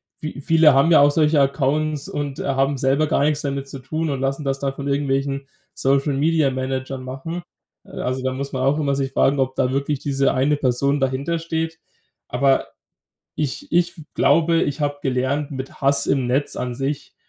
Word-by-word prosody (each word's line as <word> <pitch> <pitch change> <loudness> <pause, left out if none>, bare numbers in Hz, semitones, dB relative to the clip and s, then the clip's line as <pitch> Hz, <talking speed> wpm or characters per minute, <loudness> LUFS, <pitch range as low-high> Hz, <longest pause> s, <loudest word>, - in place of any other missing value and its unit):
Vie 155 -2 -7
viele 160 -1 +5
haben 135 +4 +4
ja 165 - +7
auch 145 0 +6
solche 150 0 +3
Accounts 140 +2 0
und, 145 -2 -4
äh, - - -3
haben 135 +1 +1
selber 135 +3 +2
gar 145 - +1
nix 150 0 +1
damit 140 -1 -3
zu 135 - -8
tun 155 +5 -3
und 135 -2 -2
lassen 135 +2 -1
das 135 0 -1
dann 135 -1 -2
von 140 0 -6
irgendwelchen 140 -1 -1 0.3
Social-Media-Managern 135 -2 0
machen. 160 +7 -6 0.4
Äh, - - -16
also 130 +1 -2
da 130 - -1
muss 140 +1 -5
man 130 - -1
auch 140 +3 +2
immer 140 -2 +1
sich 135 -1 -2
fragen, 140 +1 +2
ob 130 0 0
da 125 -1 +1
wirklich 140 +1 -1
diese 140 -1 +1
eine 140 +3 +2
Person 140 +2 +1
dahintersteht. 160 +4 -2 0.5
Aber 135 +2 +2 0.7
ich 145 -4 -3
ich 175 0 +1
f 155 - -10
glaube, 165 +3 +3
ich 145 +2 -1
habe 145 0 -1
gelernt, 135 +3 -1
mit 135 -1 -7
Hass 140 0 +2
im 135 -3 +1
Netz 135 +3 0
an 125 -1 -3
sich 135 +2 -4
140 Hz, 185 wpm, -21 LUFS, 135-150 Hz, 0.7 s, ja